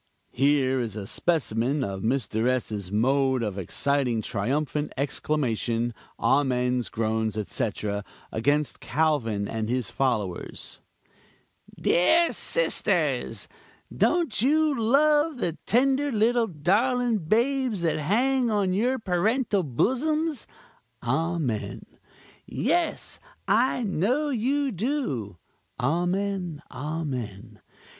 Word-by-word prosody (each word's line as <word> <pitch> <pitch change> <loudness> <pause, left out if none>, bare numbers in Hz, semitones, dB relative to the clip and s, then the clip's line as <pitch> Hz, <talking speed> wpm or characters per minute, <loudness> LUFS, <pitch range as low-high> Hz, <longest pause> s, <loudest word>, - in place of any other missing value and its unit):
Here 135 -1 +2
is 115 -4 -3
a 105 -2 -5
specimen 135 - 0
of 95 -4 -4
Mr. 110 -1 0
S.'s 110 -7 -1
mode 130 +3 +2
of 100 -3 -3
exciting 125 +4 0
triumphant 145 +8 -1
exclamation, 120 -4 -1 0.2
amens, 125 -3 +1
groans, 110 -1 -1
etc., 105 -1 -2 0.3
against 145 +6 0
Calvin 125 -10 0
and 110 -1 -3
his 125 -2 -1
followers: 110 -9 -2 1.0
"Dear 325 - +4
sisters, - - 0 0.5
don't 325 - +2
you 305 +4 +3
love 295 +6 +3
the 170 -8 -2
tender 275 +4 +3
little 230 +1 +2
darling 220 - +1
babes 235 - +1
that 160 -2 +1
hang 245 - +2
on 200 -4 +1
your 245 +7 +1
parental 210 +2 +1
bosoms? 280 - 0 0.6
(amen!) 135 -3 -1 0.6
Yes! 345 -3 -1 0.3
I 245 +4 +2
know 230 - +1
you 270 +3 0
do 185 - -2 0.4
(amen! 175 +3 -1
amen!) 125 -8 -5
155 Hz, 95 wpm, -26 LUFS, -, 1.0 s, Dear